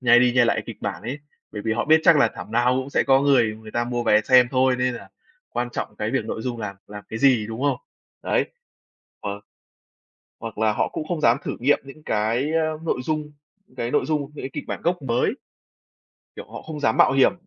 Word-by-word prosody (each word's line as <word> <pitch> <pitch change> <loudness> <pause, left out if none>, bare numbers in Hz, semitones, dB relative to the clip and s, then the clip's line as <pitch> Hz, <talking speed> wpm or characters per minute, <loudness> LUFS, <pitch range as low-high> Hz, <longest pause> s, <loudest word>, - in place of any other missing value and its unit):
nhai 120 -1 +6
đi 125 -1 +4
nhai 125 -1 +4
lại 110 -2 +1
kịch 115 - -7
bản 100 -2 -4
ấy, 130 +6 -4 0.3
bởi 105 -1 -5
vì 110 - 0
họ 115 - -1
biết 160 +1 +5
chắc 170 -2 +7
là 140 - +4
thảm 110 - -9
nào 125 +2 +3
cũng 135 +2 -7
sẽ - - +2
có 135 0 +4
người 120 -6 +3
người 110 -1 -11
ta 120 +1 -1
mua 120 0 -2
vé 105 -2 +4
xem 125 -1 +6
thôi, 130 -1 +3
nên 125 0 0
là 100 -4 -10 0.4
quan 120 0 -3
trọng 105 -3 -5
cái 105 +1 -2
việc 135 - 0
nội 110 - -4
dung 120 -2 -3
làm 100 -2 -5
làm 105 0 -10
cái 110 - -5
gì, 125 -6 +4
đúng 115 +4 -6
không? 145 - +2 0.5
Đấy, - - +1 0.8
hoặc 100 0 -5 1.0
hoặc 115 -2 -7
là 110 -1 +2
họ - - 0
cũng 155 - -5
không 170 -4 -2
dám 120 -2 +4
thử - - -4
nghiệm 140 +4 +3
những 140 +3 -13
cái, 115 +8 0
a, 160 -1 +1
nội 160 - -1
dung 155 -1 -2 0.4
cái 120 0 -2
nội - - +1
dung, 155 -1 0
những - - -8
cái 135 - -5
kịch - - -5
bản - - -4
gốc 175 -2 0
mới. 120 -1 0 1.0
Kiểu, - - -8
họ - - -7
không 155 -2 -7
dám 110 -6 +1
mạo - - +6
hiểm 135 +5 +4
125 Hz, 235 wpm, -23 LUFS, 110-140 Hz, 1.0 s, chắc